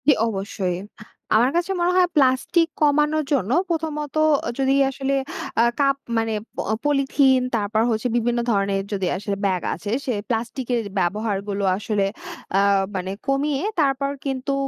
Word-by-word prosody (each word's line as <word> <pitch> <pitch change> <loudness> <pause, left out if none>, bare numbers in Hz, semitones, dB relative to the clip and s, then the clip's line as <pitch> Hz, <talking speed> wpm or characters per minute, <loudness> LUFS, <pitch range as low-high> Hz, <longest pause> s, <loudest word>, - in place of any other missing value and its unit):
জ্বি 295 - +8
অবশ্যই। 195 -3 -2 0.6
আমার 240 +4 +4
কাছে 350 +3 0
মনে 350 +1 +3
হয় 365 -1 +5
প্লাস্টিক 275 +5 +3
কমানোর 300 +1 +3
জন্য 235 -6 0 0.2
প্রথমত 310 -3 -3 0.3
আ - - -1
যদি 270 0 +3
আসলে 270 0 -1 0.5
আ - - +6 0.2
কাপ 275 -1 +3 0.2
মানে 225 0 0 0.4
অ - - +2
পলিথিন 275 -2 +3 0.2
তারপর 215 0 0
হচ্ছে 225 +1 0
বিভিন্ন 240 +1 0
ধরণের 195 -1 +1
যদি 190 -2 -1
আসলে 200 +1 -3
ব্যাগ 185 -2 +1
আছে 205 +5 -5
সেই 240 -6 -1
প্লাস্টিকের 240 +1 -1 0.2
ব্যবহারগুলো 200 +1 -1
আসলে 210 -1 0 0.5
আ - - +4 0.3
মানে 185 0 -3 0.2
কমিয়ে 275 +1 0 0.2
তারপর 275 0 +1
কিন্তু 270 0 -2
250 Hz, 145 wpm, -22 LUFS, 205-280 Hz, 0.6 s, জ্বি